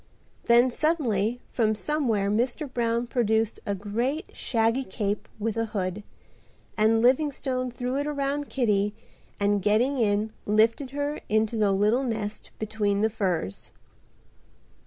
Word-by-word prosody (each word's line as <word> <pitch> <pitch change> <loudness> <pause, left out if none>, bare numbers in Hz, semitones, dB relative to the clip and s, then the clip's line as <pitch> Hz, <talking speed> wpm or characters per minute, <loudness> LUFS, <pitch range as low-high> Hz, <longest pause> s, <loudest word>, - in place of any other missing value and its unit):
Then 240 +2 +5
suddenly 245 - 0
from 220 -3 +1
somewhere 225 -7 0
Mr. 245 +7 0
Brown 235 -2 0
produced 225 -2 0
a 200 - 0
great, 235 - -2
shaggy 230 +2 +1
cape 205 -1 -3
with 220 0 -2
a 225 - +1
hood, 185 +1 -2 0.7
and 225 +1 +3
Livingstone 260 -1 +1
threw 250 +2 -3
it 285 +1 -1
around 285 0 -2
Kitty 210 -5 +1 0.4
and 205 0 +2
getting 235 +7 +2
in 215 0 +1
lifted 225 +6 +3
her 285 +2 -3
into 215 +1 +1
the 210 -2 +2
little 210 +7 +2
nest 215 -4 -3
between 205 -2 -1
the 220 +1 +2
furs. 180 - -2
225 Hz, 130 wpm, -26 LUFS, 210-255 Hz, 0.7 s, Then